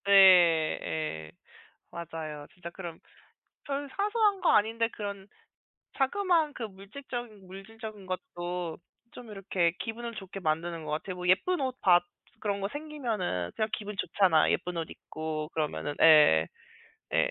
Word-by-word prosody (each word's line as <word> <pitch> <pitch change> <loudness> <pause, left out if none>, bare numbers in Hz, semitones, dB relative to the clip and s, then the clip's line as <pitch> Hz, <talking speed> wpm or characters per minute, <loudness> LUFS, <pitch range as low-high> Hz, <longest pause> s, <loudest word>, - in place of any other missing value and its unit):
네. 200 - +1 0.7
예. 80 - -4 0.6
맞아요. 160 -3 -6
진짜 175 -2 -8
그런 170 -2 -8 0.7
별 280 0 -3
사소한 415 -1 +2
거 - - +3
아닌데 225 +2 +3
그런 200 -2 -6 0.7
자그마한 325 +2 +2
그 - - -7
물질적인 215 +1 -8
물질적인 210 +2 -9
것도 180 - -4 0.3
좀 240 -3 -11
이렇게 190 -4 0
기분을 230 +1 -5
좋게 195 -1 -8
만드는 165 0 -1
것 150 - -5
같아요. 180 +4 -3
뭐 180 0 -3
예쁜 345 - +3
옷 260 -1 -2
받 175 -2 +6 0.4
그런 200 -1 -1
거 195 - -1
생기면은 235 - -3
그냥 215 - 0
기분 210 -1 -4
좋잖아. 185 -5 +3
예쁜 180 -1 -1
옷 165 -1 -3
입고 155 -1 -5
그러면은. 150 -1 -2
예. 150 - +7 0.7
예. - - +3
195 Hz, 275 characters per minute, -29 LUFS, 165-230 Hz, 0.7 s, 예